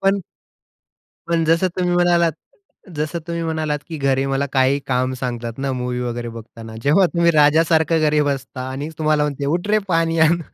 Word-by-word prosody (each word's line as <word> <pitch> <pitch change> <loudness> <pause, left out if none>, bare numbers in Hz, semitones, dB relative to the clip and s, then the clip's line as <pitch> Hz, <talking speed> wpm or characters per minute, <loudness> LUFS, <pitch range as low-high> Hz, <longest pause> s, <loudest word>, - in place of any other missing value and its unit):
पण 195 0 +2 1.1
पण 170 -1 +1
जसं 165 +3 +2
तुम्ही 180 -1 0
म्हणालात 175 -2 +3 0.6
जसं 155 +3 -2
तुम्ही 170 -1 -3
म्हणालात, 155 -2 -2
की 160 - -5
घरी 135 -1 +1
मला 135 +1 0
काहीही 135 +1 +3
काम 130 0 0
सांगतात 120 -2 -5
ना 135 0 -2
मूवी 125 -1 -3
वगैरे 120 -1 -4
बघताना. 115 0 -10
जेव्हा 170 +7 +4
तुम्ही 170 0 +2
राजासारखं 160 +1 +3
घरी 150 -1 +2
बसता 130 -2 -4
आणि 140 +3 -5
तुम्हाला 155 -1 +2
म्हणते, 145 -1 -2
"उठ 175 +6 -1
रे 215 +1 +4
पाणी 165 -1 +1
आण." 160 +2 +4
150 Hz, 170 wpm, -20 LUFS, 130-165 Hz, 1.1 s, जेव्हा